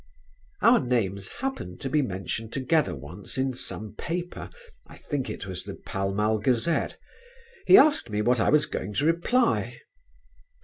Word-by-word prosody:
Our 240 Hz, +1 st, +7 dB
names 100 Hz, -7 st, -1 dB
happened 265 Hz, -, -5 dB
to 135 Hz, -, -3 dB
be 150 Hz, -, +3 dB
mentioned 110 Hz, 0 st, -4 dB
together 150 Hz, +3 st, +1 dB
once 90 Hz, -, -8 dB
in 130 Hz, 0 st, 0 dB
some 110 Hz, -3 st, -3 dB
paper, 175 Hz, +9 st, -5 dB, 0.4 s
I -, -, -13 dB
think 145 Hz, -4 st, -3 dB
it -, -, -6 dB
was 95 Hz, -2 st, -5 dB
The -, -, -7 dB
Pall 95 Hz, 0 st, -3 dB
Mall 105 Hz, +2 st, +1 dB
Gazette. 125 Hz, +8 st, 0 dB, 0.7 s
He 385 Hz, -, +9 dB
asked 300 Hz, -, +5 dB
me 105 Hz, 0 st, -1 dB
what 125 Hz, +2 st, +3 dB
I -, -, +3 dB
was 150 Hz, 0 st, +4 dB
going 100 Hz, +2 st, -5 dB
to 145 Hz, -, +1 dB
reply. 200 Hz, +10 st, +1 dB
125 Hz, 160 wpm, -26 LUFS, 100-160 Hz, 0.7 s, He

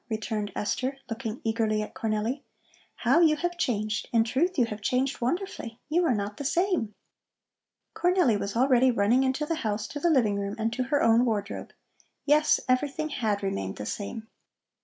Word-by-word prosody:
returned 215 Hz, -2 st, -3 dB
Esther, 260 Hz, +5 st, -2 dB
looking 225 Hz, 0 st, -4 dB
eagerly 220 Hz, -1 st, 0 dB
at -, -, -9 dB
Cornelli. 220 Hz, +5 st, -2 dB, 0.5 s
"How -, -, +3 dB
you 320 Hz, -3 st, +5 dB
have 350 Hz, +3 st, -2 dB
changed! 215 Hz, -9 st, -1 dB
In 230 Hz, -1 st, +4 dB
truth 315 Hz, +11 st, 0 dB
you 245 Hz, -, +4 dB
have 215 Hz, -2 st, -7 dB
changed 255 Hz, +5 st, 0 dB
wonderfully. 250 Hz, -, -3 dB
You 345 Hz, +3 st, +2 dB
are 255 Hz, -, +2 dB
not 205 Hz, 0 st, -4 dB
the -, -, -5 dB
same." 335 Hz, -, 0 dB, 1.0 s
Cornelli 355 Hz, -, +3 dB
was 200 Hz, +1 st, -4 dB
already 255 Hz, +1 st, +4 dB
running 235 Hz, +2 st, +3 dB
into 265 Hz, +3 st, 0 dB
the 330 Hz, -, -1 dB
house 210 Hz, -1 st, -2 dB
to 290 Hz, -, -5 dB
the 345 Hz, -, +2 dB
living 225 Hz, -10 st, +3 dB
room 200 Hz, +1 st, -3 dB
and 225 Hz, +1 st, -1 dB
to 255 Hz, +1 st, -1 dB
her 290 Hz, +3 st, +1 dB
own 230 Hz, +1 st, +5 dB
wardrobe. 210 Hz, -4 st, -2 dB, 0.5 s
Yes, 300 Hz, +1 st, +4 dB
everything 290 Hz, +4 st, 0 dB
had 215 Hz, -8 st, -1 dB
remained 95 Hz, -, -2 dB
the 105 Hz, -, -6 dB
same. 220 Hz, -, -5 dB
235 Hz, 175 wpm, -27 LUFS, 215-285 Hz, 1.0 s, you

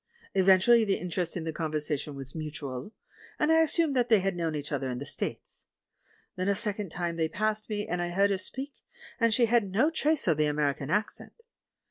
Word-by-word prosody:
Evidently 195 Hz, +5 st, +5 dB
the 200 Hz, -3 st, +1 dB
interest 180 Hz, 0 st, -3 dB
in 170 Hz, -, -4 dB
the 160 Hz, 0 st, -3 dB
conversation 150 Hz, -2 st, -3 dB
was 135 Hz, -1 st, -8 dB
mutual, 145 Hz, -1 st, -6 dB, 0.5 s
and 305 Hz, +1 st, +2 dB
I 320 Hz, 0 st, +6 dB
assumed 320 Hz, -2 st, +2 dB
that 245 Hz, -1 st, +2 dB
they 220 Hz, -3 st, +6 dB
had 195 Hz, 0 st, -1 dB
known 165 Hz, -3 st, -2 dB
each 145 Hz, -1 st, -5 dB
other 135 Hz, -2 st, -2 dB
in 125 Hz, -, -3 dB
the 140 Hz, -, -6 dB
States. -, -, -5 dB, 0.7 s
Then 185 Hz, +1 st, -2 dB
a 200 Hz, -, +3 dB
second 205 Hz, -3 st, -3 dB
trnie 170 Hz, 0 st, -3 dB
they 160 Hz, -1 st, 0 dB
passed 215 Hz, +4 st, -2 dB
me, 210 Hz, -1 st, -2 dB
and 180 Hz, 0 st, -2 dB
I 175 Hz, -, -2 dB
heard 200 Hz, +3 st, +2 dB
her 195 Hz, -, 0 dB
speak, 265 Hz, +8 st, -6 dB, 0.5 s
and 230 Hz, -1 st, +3 dB
she 235 Hz, +2 st, +4 dB
had 230 Hz, -3 st, +2 dB
no 240 Hz, -, +2 dB
trace 310 Hz, -4 st, 0 dB
of 160 Hz, -4 st, +3 dB
the 155 Hz, 0 st, +3 dB
American 145 Hz, -1 st, -1 dB
accent. 210 Hz, +6 st, -2 dB
185 Hz, 205 wpm, -29 LUFS, 155-220 Hz, 0.7 s, I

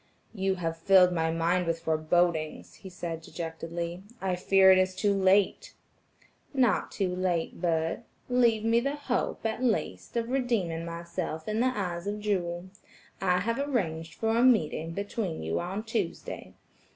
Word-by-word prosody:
"You 195 Hz, -2 st, 0 dB
have 165 Hz, -2 st, -3 dB
filled 185 Hz, 0 st, +6 dB
my 160 Hz, -1 st, +1 dB
mind 170 Hz, +2 st, +1 dB
with 165 Hz, 0 st, -1 dB
forbodings," 160 Hz, 0 st, 0 dB
he 190 Hz, -, -10 dB
said 170 Hz, -2 st, -5 dB
dejectedly, 170 Hz, +1 st, -5 dB, 0.2 s
"I 190 Hz, -1 st, -1 dB
fear 190 Hz, +1 st, +5 dB
it 185 Hz, -, +6 dB
is 185 Hz, 0 st, +1 dB
too 200 Hz, +1 st, +2 dB
late." 195 Hz, 0 st, +2 dB, 0.8 s
"Not 250 Hz, -4 st, +2 dB
too 185 Hz, -3 st, -1 dB
late, 180 Hz, -3 st, -1 dB
Bert; 165 Hz, -2 st, 0 dB, 0.3 s
leave 235 Hz, -3 st, +3 dB
me 230 Hz, +1 st, +4 dB
the 275 Hz, +4 st, -1 dB
hope, 270 Hz, -5 st, -2 dB
at 225 Hz, +3 st, -1 dB
least, 235 Hz, 0 st, -1 dB
of 230 Hz, 0 st, -1 dB
redeeming 215 Hz, -11 st, 0 dB
myself 170 Hz, -1 st, -5 dB
in 215 Hz, +1 st, -1 dB
the 250 Hz, -, +3 dB
eyes 180 Hz, -2 st, -3 dB
of 205 Hz, +1 st, -2 dB
Jewel. 185 Hz, -3 st, -2 dB, 0.5 s
I 180 Hz, -1 st, +2 dB
have 230 Hz, +5 st, -1 dB
arranged 170 Hz, -, -2 dB
for 225 Hz, 0 st, 0 dB
a 235 Hz, -, +3 dB
meeting 165 Hz, -9 st, +3 dB
between 200 Hz, -, -3 dB
you 80 Hz, +1 st, -1 dB
on 190 Hz, +5 st, -3 dB
Tuesday. 220 Hz, -6 st, -4 dB
185 Hz, 155 wpm, -28 LUFS, 165-215 Hz, 0.8 s, filled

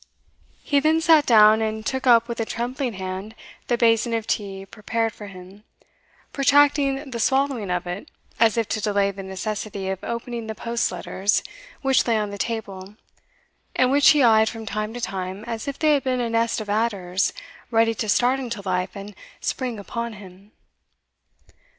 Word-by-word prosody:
He 285 Hz, -3 st, +2 dB
then 310 Hz, +3 st, +3 dB
sate 320 Hz, -2 st, +5 dB
down, 215 Hz, -1 st, +6 dB
and 220 Hz, 0 st, -3 dB
took 260 Hz, +2 st, -2 dB
up 235 Hz, -1 st, +6 dB
with 235 Hz, -1 st, -5 dB
a -, -, +1 dB
trembling 245 Hz, +2 st, -3 dB
hand 190 Hz, +3 st, -6 dB, 0.3 s
the 240 Hz, -, +1 dB
basin 230 Hz, 0 st, +3 dB
of 225 Hz, -1 st, -2 dB
tea 195 Hz, -3 st, -3 dB
prepared 225 Hz, +2 st, -2 dB
for 210 Hz, -, -10 dB
him, 190 Hz, +1 st, -13 dB, 0.7 s
protracting 280 Hz, 0 st, +3 dB
the 235 Hz, -, -4 dB
swallowing 265 Hz, -4 st, +1 dB
of 180 Hz, 0 st, -1 dB
it, 180 Hz, +3 st, -6 dB, 0.3 s
as 225 Hz, 0 st, +4 dB
if 225 Hz, -2 st, +1 dB
to 215 Hz, -, -1 dB
delay 200 Hz, -1 st, +1 dB
the 195 Hz, 0 st, -8 dB
necessity 195 Hz, +1 st, -4 dB
of 190 Hz, -1 st, -4 dB
opening 235 Hz, -1 st, -5 dB
the 220 Hz, -, -5 dB
post 235 Hz, +1 st, -1 dB
letters 190 Hz, +3 st, -1 dB, 0.4 s
which 270 Hz, -1 st, +3 dB
lay 230 Hz, -2 st, +3 dB
on 210 Hz, -1 st, -2 dB
the 200 Hz, -, -7 dB
table, 200 Hz, -4 st, -5 dB, 0.8 s
and 255 Hz, 0 st, +3 dB
which 285 Hz, +1 st, +6 dB
he 295 Hz, -3 st, +5 dB
eyed 220 Hz, -2 st, +5 dB
from 225 Hz, -1 st, -8 dB
time 215 Hz, +1 st, -3 dB
to 245 Hz, -, -6 dB
time, 190 Hz, -1 st, -4 dB
as 230 Hz, +2 st, -5 dB
if 280 Hz, -, -4 dB
they 310 Hz, -1 st, +3 dB
had 280 Hz, -3 st, +1 dB
been 255 Hz, -1 st, 0 dB
a 235 Hz, -2 st, -1 dB
nest 230 Hz, 0 st, +1 dB
of 215 Hz, -, -7 dB
adders 200 Hz, -4 st, 0 dB, 0.4 s
ready 225 Hz, -1 st, +3 dB
to 220 Hz, -1 st, -4 dB
start 250 Hz, +5 st, +3 dB
into 235 Hz, -6 st, -5 dB
life 180 Hz, +1 st, -1 dB
and 200 Hz, +1 st, -8 dB, 0.3 s
spring 250 Hz, -4 st, -3 dB
upon 235 Hz, +3 st, -5 dB
him. 195 Hz, 0 st, -14 dB
225 Hz, 180 wpm, -23 LUFS, 200-245 Hz, 0.8 s, down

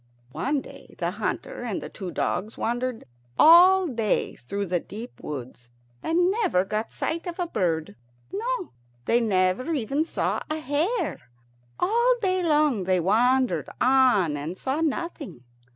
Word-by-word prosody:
One 280 Hz, -, -1 dB
day -, -, -14 dB
the -, -, -1 dB
hunter -, -, -4 dB
and 235 Hz, -5 st, -3 dB
the -, -, -7 dB
two 190 Hz, -4 st, -7 dB
dogs 195 Hz, +5 st, -2 dB
wandered 245 Hz, 0 st, -2 dB, 0.3 s
all 365 Hz, +4 st, +8 dB
day 230 Hz, -, 0 dB
through 200 Hz, +12 st, -4 dB
the 180 Hz, -1 st, 0 dB
deep 220 Hz, +8 st, -10 dB
woods, 125 Hz, -4 st, -7 dB, 0.3 s
and 350 Hz, +3 st, +2 dB
never 385 Hz, -, +1 dB
got 215 Hz, +3 st, -2 dB
a -, -, -29 dB
sight 335 Hz, +3 st, -3 dB
of 345 Hz, -, -5 dB
a 355 Hz, -, -1 dB
bird; 170 Hz, -, -1 dB, 0.4 s
no, 460 Hz, 0 st, -3 dB, 0.3 s
they 240 Hz, +1 st, +3 dB
never 200 Hz, -, +1 dB
even 275 Hz, +4 st, 0 dB
saw -, -, -1 dB
a 310 Hz, -, -1 dB
hare. 315 Hz, -, -2 dB, 0.5 s
All 475 Hz, +5 st, +3 dB
day 370 Hz, -3 st, +1 dB
long 300 Hz, -, +2 dB
they 185 Hz, 0 st, +2 dB
wandered 245 Hz, +8 st, +2 dB
on 250 Hz, -, +4 dB
and 155 Hz, +6 st, -5 dB
saw 270 Hz, +8 st, -2 dB
nothing. 320 Hz, -, -3 dB
255 Hz, 150 wpm, -25 LUFS, -, 0.5 s, all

